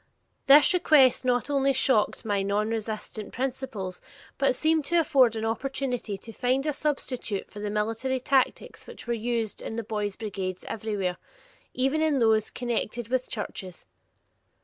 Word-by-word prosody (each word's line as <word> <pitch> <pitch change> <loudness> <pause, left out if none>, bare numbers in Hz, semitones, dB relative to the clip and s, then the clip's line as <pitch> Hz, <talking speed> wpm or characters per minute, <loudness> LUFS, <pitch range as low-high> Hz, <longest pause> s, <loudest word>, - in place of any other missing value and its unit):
This 290 +7 +8
request 280 -8 +4
not 245 0 +1
only 275 -1 +2
shocked 245 -3 +2
my 205 -2 +1
nonresistant 215 +1 -3
principles, 250 -8 -4 0.4
but 275 -2 +3
seemed 315 +3 +2
to 340 +4 +3
afford 265 -7 +4
an 220 0 -2
opportunity 250 -2 -2
to 225 +3 -11
find 255 +4 0
a 300 - 0
substitute 265 -8 -3
for 205 - -9
the 205 0 -3
military 225 +5 -1
tactics 260 0 0
which - - -11
were 240 - -1
used 230 -1 -2
in 225 - -5
the 230 - -3
boys' 210 -2 -3
brigades 190 -4 -5
everywhere, 200 -5 -2 0.6
even 270 +5 +1
in 310 -3 +2
those 220 -3 +3
connected 240 -1 -3
with 255 0 -1
churches. 190 -4 -6
235 Hz, 150 wpm, -27 LUFS, 210-270 Hz, 0.6 s, This